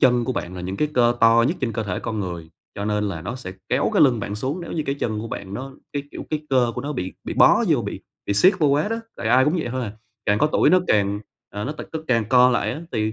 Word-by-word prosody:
chân 125 Hz, -3 st, +4 dB
của 130 Hz, -, -1 dB
bạn 90 Hz, -6 st, -4 dB
là 90 Hz, -, -6 dB
những 95 Hz, +2 st, -4 dB
cái 150 Hz, -, +1 dB
cơ 120 Hz, -1 st, +4 dB
to 115 Hz, +1 st, +6 dB
nhất 170 Hz, -, -1 dB
trên 125 Hz, -4 st, -1 dB
cơ 110 Hz, -, -2 dB
thể 95 Hz, -4 st, -3 dB
con 110 Hz, -2 st, -3 dB
người, 85 Hz, -4 st, -5 dB, 0.2 s
cho 100 Hz, -, -4 dB
nên 105 Hz, 0 st, 0 dB
là 90 Hz, -5 st, -5 dB
nó 115 Hz, +9 st, -4 dB
sẽ 110 Hz, -8 st, -7 dB, 0.2 s
kéo -, -, +1 dB
cái -, -, +5 dB
lưng 125 Hz, -6 st, +4 dB
bạn 100 Hz, -, -4 dB
xuống, 135 Hz, -, -3 dB
nếu 170 Hz, -, -7 dB
như 155 Hz, -, -1 dB
cái 140 Hz, -, 0 dB
chân 110 Hz, -6 st, -2 dB
của 115 Hz, -, -6 dB
bạn 100 Hz, -2 st, -6 dB
nó 135 Hz, +4 st, -6 dB, 0.2 s
cái 145 Hz, -, -2 dB
kiểu, -, -, -7 dB
cái 155 Hz, -1 st, -3 dB
cơ 125 Hz, -3 st, +3 dB
của -, -, -3 dB
nó 145 Hz, +2 st, -4 dB
bị 95 Hz, -9 st, -4 dB
bị -, -, -4 dB
bó -, -, +6 dB
vô -, -, +3 dB
bị -, -, -5 dB, 0.3 s
bị 100 Hz, -, 0 dB
siết 185 Hz, -, +5 dB
vô 155 Hz, -, +3 dB
quá 145 Hz, +6 st, +2 dB
đó, 225 Hz, -, -1 dB, 0.2 s
tại 120 Hz, -, -3 dB
ai 130 Hz, +3 st, +5 dB
cũng 150 Hz, +4 st, +2 dB
vậy 160 Hz, -, -2 dB
thôi 130 Hz, +1 st, -2 dB
à. 105 Hz, -, -6 dB, 0.3 s
Càng 105 Hz, 0 st, +3 dB
có 150 Hz, -, +4 dB
tuổi 155 Hz, -, +3 dB
nó 185 Hz, -, +5 dB
càng, 100 Hz, -1 st, +2 dB, 0.3 s
ờ, 105 Hz, +1 st, -5 dB
nó 145 Hz, -, -3 dB
t 155 Hz, -, -9 dB
tức 160 Hz, -1 st, -5 dB
càng 115 Hz, -3 st, +2 dB
co 125 Hz, 0 st, +6 dB
lại 120 Hz, -, +1 dB
á 150 Hz, -, -6 dB
thì 110 Hz, 0 st, 0 dB
120 Hz, 305 wpm, -23 LUFS, 105-140 Hz, 0.3 s, to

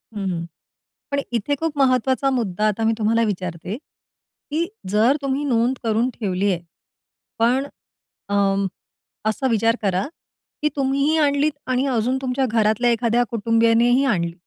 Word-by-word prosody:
हं, 200 Hz, -2 st, -3 dB
हं. 170 Hz, -2 st, -3 dB, 0.7 s
पण 280 Hz, -, +1 dB
इथे 240 Hz, +5 st, 0 dB
खूप 320 Hz, 0 st, -3 dB
महत्त्वाचा 260 Hz, 0 st, +2 dB
मुद्दा 215 Hz, -4 st, 0 dB
आता 215 Hz, +2 st, -1 dB
मी 225 Hz, -, +3 dB
तुम्हाला 225 Hz, +1 st, +2 dB
विचारते, 180 Hz, -2 st, -4 dB
की 310 Hz, +2 st, -7 dB, 0.2 s
जर 220 Hz, +7 st, +4 dB
तुम्ही 275 Hz, +1 st, -1 dB
नोंद 245 Hz, 0 st, +1 dB
करून 225 Hz, +2 st, +1 dB
ठेवली 200 Hz, -2 st, 0 dB
आहे. 170 Hz, -2 st, -2 dB, 0.8 s
पण, 250 Hz, +4 st, +2 dB, 0.6 s
अं, 200 Hz, -1 st, +2 dB, 0.6 s
असा 220 Hz, +5 st, 0 dB
विचार 225 Hz, +1 st, +2 dB
करा, 190 Hz, -1 st, 0 dB, 0.6 s
की 300 Hz, -, +2 dB
तुम्हीही 280 Hz, +3 st, +1 dB
आणलीत 290 Hz, 0 st, +2 dB, 0.2 s
आणि 255 Hz, +1 st, +1 dB
अजून 250 Hz, +1 st, +1 dB
तुमच्या 260 Hz, 0 st, 0 dB
घरातल्या 225 Hz, +1 st, +2 dB
एखाद्या 235 Hz, +1 st, +2 dB
कुटुंबियानेही 230 Hz, +3 st, +3 dB
आणली, 170 Hz, -8 st, 0 dB
230 Hz, 135 wpm, -22 LUFS, 210-265 Hz, 0.8 s, जर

